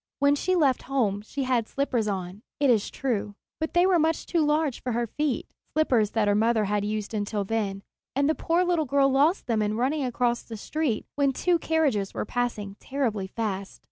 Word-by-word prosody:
When 285 0 +4
she 370 +6 +1
left 280 -7 +3
home 215 -7 +1
she 275 +6 -4
had 250 -4 +1
slippers 250 -6 -1
on, 190 0 -4 0.2
it 280 -3 +4
is 220 -4 +2
true; 215 -6 -2 0.2
but 315 +1 -3
they 350 +1 +5
were 370 -2 +4
much 320 +1 +1
too 335 -3 +1
large 300 -3 +1
for 250 - -2
her 240 +1 0
feet, 290 +4 -2 0.3
slippers 250 -9 +3
that 220 -2 +2
her 205 - +4
mother 220 +1 +2
had 205 0 0
used 210 +1 -3
until 205 -1 -1
then, 200 -2 -2 0.3
and 280 +1 +2
the 310 - +3
poor 335 +3 +1
little 350 -3 +1
girl 275 0 +3
lost 290 +8 +3
them 225 -3 +1
in 210 +1 0
running 275 +5 0
across 240 -1 0
the 225 - -8
street 290 0 -2
when 280 -2 +1
two 350 +5 +1
carriages 285 -13 0
were - - -2
passing 215 -4 -3
terribly 230 -8 -2
fast. 200 -2 -4
245 Hz, 205 wpm, -26 LUFS, 210-290 Hz, 0.3 s, they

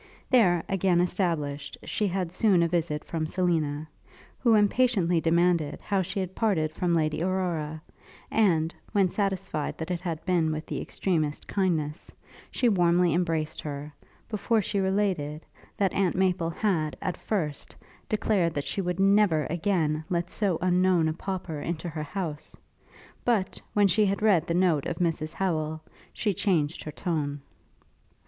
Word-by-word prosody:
There, 185 -10 +4
again 190 -2 +2
established, 170 -6 -1
she 210 - -1
had 185 -2 -2
soon 185 -2 +3
a - - +3
visit 165 -3 -1
from 160 -2 -2
Selina, 155 -4 0 0.5
who 235 -3 +4
impatiently 205 -5 +3
demanded, 170 -2 +2
how 200 -2 0
she 190 +2 -3
had 185 -1 -3
parted 185 -9 +1
from 170 +1 0
Lady 155 -1 0
Aurora; 170 -4 -2 0.5
and, 170 -7 +2 0.2
when 195 -3 +3
satisfied 195 -6 -2
that 160 +2 -4
it 175 -1 -2
had 165 -3 -4
been 170 -4 +2
with 155 +1 -4
the - - -4
extremest 155 -6 -2
kindness, 165 -5 -1 0.4
she 250 - +1
warmly 175 -4 +3
embraced 165 -3 -1
her, 145 0 -6 0.3
before 225 +1 +1
she 200 0 -1
related, 190 -6 0 0.3
that 195 -2 +1
Aunt 190 -3 +1
Maple 180 -3 +1
had, 170 -4 -1
at 185 - -2
first, 160 -9 -3 0.3
declared, 195 -6 +1
that 145 0 -2
she 170 +7 -2
would 180 0 -2
never, 195 -5 +4
again, 160 -3 0
let 175 0 -1
so 195 -6 0
unknown 180 -2 +3
a - - -1
pauper 180 -3 -4
into 170 +2 -3
her 155 -2 -4
house; 150 -1 -5 0.7
but, 220 -6 0
when 205 -1 +5
she 205 +3 +3
had 200 +2 -1
read 185 -7 +4
the 170 - 0
note 175 -6 +2
of 165 - -3
Mrs 160 -2 -1
Howel, 160 -4 -1 0.3
she 210 -3 -1
changed 165 -6 0
her 155 - -5
tone. 145 -5 -2
175 Hz, 155 wpm, -27 LUFS, 155-195 Hz, 0.7 s, when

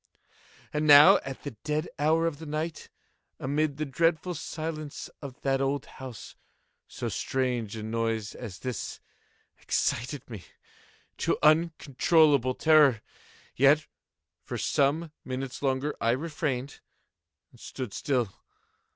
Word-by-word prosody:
And 150 +1 0
now 145 0 +9
at 135 -1 -8
the 145 - -5
dead 150 +2 -1
hour 160 +3 +3
of 155 -3 -2
the 160 - -8
night, 155 +2 -4 0.5
amid 145 +2 0
the 155 - -2
dreadful 165 +5 +1
silence 155 -1 -6
of 135 -3 -9
that 135 0 +1
old 135 0 -1
house, 130 -5 -10 0.5
so - - -5
strange 125 -5 -2
a 110 - -6
noise 115 -1 -2
as 105 -7 -8
this 125 -2 -5 0.6
excited 130 +4 -1
me 110 -7 -8 0.8
to - - +1
uncontrollable 155 -3 +3
terror. 150 -8 +5 0.5
Yet, 145 +3 +5 0.6
for - - -5
some 150 +4 +1
minutes 130 0 -5
longer 135 +2 0
I 115 - +2
refrained 140 -2 -3 0.7
and - - -20
stood 125 -7 -6
still. 125 -8 -1
140 Hz, 120 wpm, -28 LUFS, 130-155 Hz, 0.8 s, now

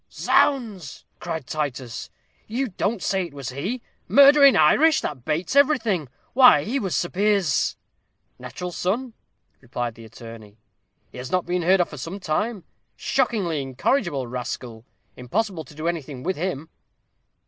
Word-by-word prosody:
"Zounds!" 215 - 0
cried 160 -5 -5
Titus, 135 -5 -4 0.4
"you 250 +4 -2
don't 200 +1 -2
say 190 -2 0
it 145 - -17
was 140 -4 -5
he? 190 - -4 0.2
Murder 280 +1 +7
in 275 - +8
Irish! 320 0 +5
that 125 -2 -5
bates 165 - -2
everything; 230 - +2 0.2
why, 250 - +7
he 255 - -1
was 190 -6 -2
Sir 175 - 0
Piers's 200 -5 +1 0.3
" - - -47
"Natural 130 +9 -6
son," 225 +8 -2 0.5
replied 120 -2 -4
the 115 0 -13
attorney; 110 -2 -12 0.5
"he - - -10
has 125 0 -7
not 185 -1 +1
been 180 +1 -1
heard 185 +2 +4
of 175 - -1
for 150 - -9
some 165 +9 -6
time 195 +5 -2 0.3
shockingly 200 - 0
incorrigible 140 - -1
rascal 120 -1 -6 0.3
impossible 180 - -2
to 145 - -15
do 155 +2 -4
anything 145 -6 -4
with 190 +1 -1
him." 160 -2 -4
175 Hz, 150 wpm, -23 LUFS, 135-215 Hz, 0.5 s, in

